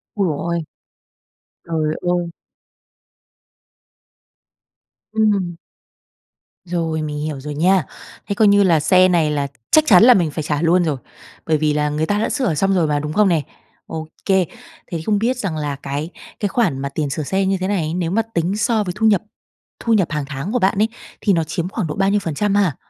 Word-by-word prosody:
Ôi 200 Hz, -, +1 dB
giời 150 Hz, -4 st, -1 dB, 0.2 s
ơi! 170 Hz, -, -1 dB, 1.0 s
Trời 155 Hz, -2 st, -1 dB
ơi! 175 Hz, -1 st, 0 dB, 2.9 s
Ừm. 205 Hz, -5 st, +1 dB, 1.1 s
Rồi, 165 Hz, -2 st, -2 dB
mình 150 Hz, -1 st, -4 dB
hiểu 150 Hz, -2 st, -4 dB
rồi 150 Hz, +2 st, -6 dB
nha. 180 Hz, +3 st, +3 dB, 0.4 s
Thế 200 Hz, -, -2 dB
coi 215 Hz, +1 st, +4 dB
như 200 Hz, 0 st, +5 dB
là 170 Hz, -5 st, +4 dB
xe 185 Hz, +4 st, +5 dB
này 165 Hz, -4 st, +2 dB
là 145 Hz, -1 st, -1 dB, 0.2 s
chắc 310 Hz, -, +6 dB
chắn 195 Hz, 0 st, +7 dB
là 250 Hz, -, +9 dB
mình 170 Hz, -8 st, +1 dB
phải 155 Hz, 0 st, -4 dB
trả 150 Hz, 0 st, -1 dB
luôn 175 Hz, +2 st, +3 dB
rồi. 155 Hz, -5 st, -1 dB, 0.5 s
Bởi 160 Hz, -1 st, +2 dB
vì 150 Hz, 0 st, +1 dB
là 150 Hz, 0 st, 0 dB
người 150 Hz, +2 st, -1 dB
ta 205 Hz, +4 st, 0 dB
đã 220 Hz, -, 0 dB
sửa 255 Hz, -11 st, 0 dB
xong 195 Hz, +5 st, +1 dB
rồi 170 Hz, -4 st, +2 dB
mà, 145 Hz, -1 st, +1 dB
đúng 150 Hz, +1 st, -4 dB
không 210 Hz, +2 st, +4 dB
nè? 165 Hz, -3 st, +2 dB, 0.4 s
Ô 160 Hz, -1 st, -6 dB, 0.2 s
kê, 190 Hz, -2 st, +3 dB, 0.4 s
thế 165 Hz, -2 st, -4 dB
không 210 Hz, -2 st, +2 dB
biết 245 Hz, +4 st, 0 dB
rằng 190 Hz, -9 st, -3 dB
là 145 Hz, -2 st, -2 dB
cái 140 Hz, +4 st, -4 dB, 0.3 s
cái 205 Hz, -, 0 dB
khoản 190 Hz, -, 0 dB
mà 140 Hz, +1 st, -3 dB
tiền 145 Hz, 0 st, -2 dB
sửa 155 Hz, -, -3 dB
xe 190 Hz, +6 st, 0 dB
như 195 Hz, 0 st, +1 dB
thế 185 Hz, 0 st, -2 dB
này, 170 Hz, -6 st, -1 dB
nếu 175 Hz, -2 st, -1 dB
mà 225 Hz, +4 st, +2 dB
tính 175 Hz, +4 st, 0 dB
so 220 Hz, 0 st, +1 dB
với 180 Hz, -3 st, -4 dB
thu 220 Hz, -, +1 dB
nhập 205 Hz, -3 st, +4 dB, 0.6 s
thu 230 Hz, -, +1 dB
nhập 195 Hz, -6 st, +3 dB
hàng 150 Hz, -3 st, -2 dB
tháng 145 Hz, +7 st, -5 dB
của 250 Hz, -, +2 dB
bạn 195 Hz, 0 st, +2 dB
ấy, 215 Hz, -, +4 dB, 0.3 s
thì 205 Hz, -, +3 dB
nó 165 Hz, -2 st, +2 dB
chiếm 170 Hz, +2 st, -3 dB
khoảng 195 Hz, -4 st, -3 dB
độ 150 Hz, -, -4 dB
bao 195 Hz, 0 st, +2 dB
nhiêu 205 Hz, -, +2 dB
phần 165 Hz, -6 st, -4 dB
trăm 205 Hz, +4 st, 0 dB
ha? 190 Hz, -8 st, +2 dB
175 Hz, 210 wpm, -20 LUFS, 155-200 Hz, 2.9 s, là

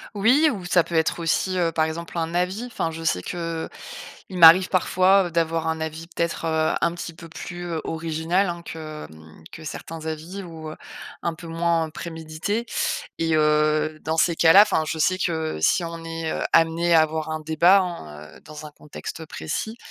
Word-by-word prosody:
Oui, 250 Hz, +10 st, +4 dB
ou 195 Hz, -8 st, -6 dB
ça 175 Hz, -1 st, +3 dB
peut 170 Hz, -, -6 dB
être 160 Hz, +1 st, +1 dB
aussi, 180 Hz, +3 st, 0 dB
heu, 170 Hz, -2 st, +1 dB
par 160 Hz, -1 st, +1 dB
exemple 170 Hz, +2 st, -6 dB
un 165 Hz, 0 st, -2 dB
avis. 180 Hz, +6 st, -1 dB
Enfin, 230 Hz, -9 st, -3 dB
je 165 Hz, 0 st, -7 dB
sais 90 Hz, -, +1 dB
qu'il 165 Hz, -, -4 dB, 0.7 s
m'arrive 170 Hz, +2 st, +9 dB
parfois, 185 Hz, +1 st, +3 dB
heu, -, -, -5 dB
d'avoir 165 Hz, -1 st, 0 dB
un 160 Hz, 0 st, -2 dB
avis 160 Hz, +1 st, -5 dB
peut-être, 170 Hz, -1 st, -2 dB
heu, 160 Hz, -1 st, +1 dB
un 170 Hz, -, +2 dB
petit 175 Hz, -1 st, -6 dB
peu 165 Hz, 0 st, -12 dB
plus 175 Hz, +2 st, -7 dB, 0.2 s
original, 165 Hz, +4 st, -1 dB
hein, 170 Hz, 0 st, -5 dB
que 155 Hz, -2 st, -7 dB
hem 80 Hz, 0 st, -16 dB
que, 165 Hz, -, -10 dB
certains 160 Hz, +1 st, -7 dB
avis. 165 Hz, +5 st, -5 dB
Ou 160 Hz, -3 st, -8 dB, 0.5 s
un 170 Hz, -, -1 dB
peu 170 Hz, +1 st, -11 dB
moins 165 Hz, -1 st, 0 dB
prémédités 165 Hz, +7 st, -4 dB, 0.5 s
et 165 Hz, -1 st, +1 dB
heu, 155 Hz, 0 st, +2 dB
dans 160 Hz, 0 st, -2 dB
ces 170 Hz, +1 st, +3 dB
cas-là, 170 Hz, +6 st, +8 dB
enfin 160 Hz, -6 st, +1 dB
je 160 Hz, -, -3 dB
sais 185 Hz, +4 st, +2 dB
que 160 Hz, -, -2 dB
si 170 Hz, -, +2 dB
on 165 Hz, 0 st, -6 dB
est, 165 Hz, -1 st, -4 dB
heu, -, -, -3 dB
amené 165 Hz, +1 st, +3 dB
à 160 Hz, -, +7 dB
avoir 155 Hz, 0 st, -2 dB
un 155 Hz, 0 st, -3 dB
débat 165 Hz, +5 st, +4 dB
hein, 75 Hz, -, -7 dB
heu, -, -, -16 dB
dans 155 Hz, 0 st, -10 dB
un 150 Hz, -, -10 dB
contexte 150 Hz, +2 st, -8 dB
précis, 220 Hz, -, -4 dB
165 Hz, 190 wpm, -23 LUFS, 160-175 Hz, 0.7 s, m'arrive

